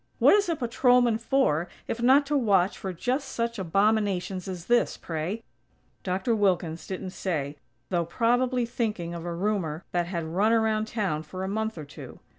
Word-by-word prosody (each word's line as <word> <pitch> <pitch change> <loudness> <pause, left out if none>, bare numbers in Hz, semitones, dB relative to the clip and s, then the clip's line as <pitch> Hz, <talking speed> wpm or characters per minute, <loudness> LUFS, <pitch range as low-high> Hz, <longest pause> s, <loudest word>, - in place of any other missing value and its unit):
What - - +6
is 410 -3 +3
a 335 - +1
patrolman 245 -2 +3
for, 225 - +1 0.2
if 230 - -3
not 265 +4 +5
to 295 +1 -1
watch 200 -8 +3
for 190 - -5
just 250 - -2
such 235 -1 -2
abominations 195 0 +1
as 180 -2 -6
this, 240 0 +2
pray?" 170 +7 -4 0.6
Dr. 190 +5 0
Wilkins 175 -5 0
didn't 190 0 -5
say, 150 -7 -3 0.3
though 170 -2 0
probably 245 +6 +1
thinking 215 -8 -3
of 170 0 -6
a 170 -1 -3
rumor 180 -4 -1
that 175 -1 0
had 170 -2 -3
run 190 +8 +1
around 220 -1 +2
town 195 -10 -1
for 185 +4 -7
a - - -2
month 220 +1 -2
or 155 - -6
two. 140 - -11
200 Hz, 175 wpm, -27 LUFS, 175-235 Hz, 0.6 s, What